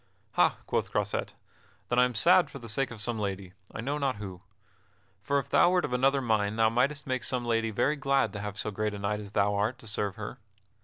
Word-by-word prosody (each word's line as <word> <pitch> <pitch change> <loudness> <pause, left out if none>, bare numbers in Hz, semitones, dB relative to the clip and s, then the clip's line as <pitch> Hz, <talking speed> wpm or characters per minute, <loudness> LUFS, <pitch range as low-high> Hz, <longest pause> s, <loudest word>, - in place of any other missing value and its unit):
"Ha," - - +3
quoth - - -1
Croisette, - - -2 0.5
"then 125 - +2
am 125 0 +5
I - - -7
sad 175 +7 +5
for 145 - -9
the 120 -3 -10
sake 125 +5 0
of 110 -3 -5
some 115 -1 -1
lady, 95 -3 -4 0.2
I 110 - -5
know 140 +5 -2
not 135 -4 0
who. 95 -3 -8 0.8
For 140 +7 0
if 140 - -1
thou 175 - +6
wert 180 -1 +2
of - - -4
another 135 +2 +3
mind 110 -3 +1
thou 110 -1 +4
mightest 135 +6 +1
make 130 -2 -2
some 120 +2 -1
lady 115 -1 +1
very 140 +8 +1
glad 135 -5 +1
to 100 - -5
have 105 0 -5
so 105 - -3
great 105 +1 -2
a - - -5
knight 100 +1 -1
as 105 -1 -9
thou 100 0 +2
art 105 +5 0
to 120 - -16
serve 100 -2 -2
her." 110 -1 -7
115 Hz, 240 wpm, -29 LUFS, 105-135 Hz, 0.8 s, thou